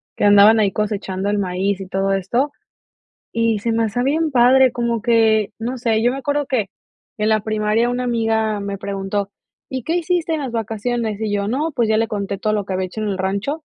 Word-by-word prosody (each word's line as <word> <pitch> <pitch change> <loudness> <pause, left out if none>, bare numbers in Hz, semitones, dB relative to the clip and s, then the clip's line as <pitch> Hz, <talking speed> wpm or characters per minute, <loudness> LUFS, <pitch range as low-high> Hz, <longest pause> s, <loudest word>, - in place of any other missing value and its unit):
que - - -3
andaban 205 +2 +7
ahí 200 -2 +2
cosechando 200 -2 -2
el 205 0 0
maíz 190 +1 -1
y 190 - -7
todo 195 +1 0
esto. 235 +9 0 0.8
Y 230 -1 +1
se 230 +2 -1
me 225 0 +1
hacía 245 +3 -1
bien 310 +4 +1
padre, 255 0 +5
como 235 -2 -1
que 220 -3 +3
no 240 +3 -4
sé, 225 -2 +1
yo 245 - +3
me 270 - -4
acuerdo 285 +2 -1
que 235 -7 -1 0.5
en 215 0 +1
la 215 0 +3
primaria 215 +2 0
una 245 +1 -2
amiga 225 -3 0
me 200 0 -4
preguntó: 195 0 -3 0.4
"¿Y 260 -1 -4
qué 325 +7 -1
hiciste 340 -1 0
en 305 - -3
las 265 -3 -4
vacaciones?", 225 -1 -2
y 215 -2 -2
yo: 200 0 -1
"No", 295 +8 -1
pues 235 -3 +1
ya 215 - +3
le 225 - +1
conté 200 -2 -3
todo 215 +2 -1
lo 210 -1 0
que 190 - -4
había 185 0 -1
hecho 200 +4 -7
en 215 - -1
el 195 - -2
rancho. 200 +11 -2
220 Hz, 220 wpm, -20 LUFS, 200-245 Hz, 0.8 s, andaban